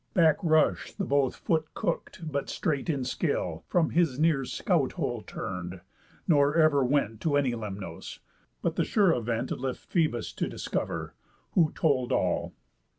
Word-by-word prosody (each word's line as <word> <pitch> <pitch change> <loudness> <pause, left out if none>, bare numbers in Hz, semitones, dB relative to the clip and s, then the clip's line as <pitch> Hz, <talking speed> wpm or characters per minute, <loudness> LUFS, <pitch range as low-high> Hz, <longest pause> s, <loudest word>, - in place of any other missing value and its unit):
Back 160 -4 +5
rush'd 160 -3 +2
the 195 - -1
both 140 -3 +2
foot 160 -2 -1
cook'd, 165 -1 -3
but 140 0 -2
straight 155 -5 -1
in 140 -5 0
skill, 125 - -2
From 170 -3 +2
his 165 -7 +2
near 150 -3 +2
scout - - 0
hole - - -2
turn'd, 90 -1 -6 0.5
nor 145 -3 +4
ever 155 -4 +5
went 125 -5 0
To 145 -3 +2
any 140 -3 +2
Lemnos, 100 -6 -6 0.5
but - - -1
the - - +3
sure 200 -5 +3
event 120 0 -2
Left 130 0 -4
Phœbus 155 - 0
to - - -1
discover, - - -3 0.4
who 165 -4 +3
told 130 -6 +1
all. - - 0
140 Hz, 150 wpm, -28 LUFS, 125-160 Hz, 0.5 s, Back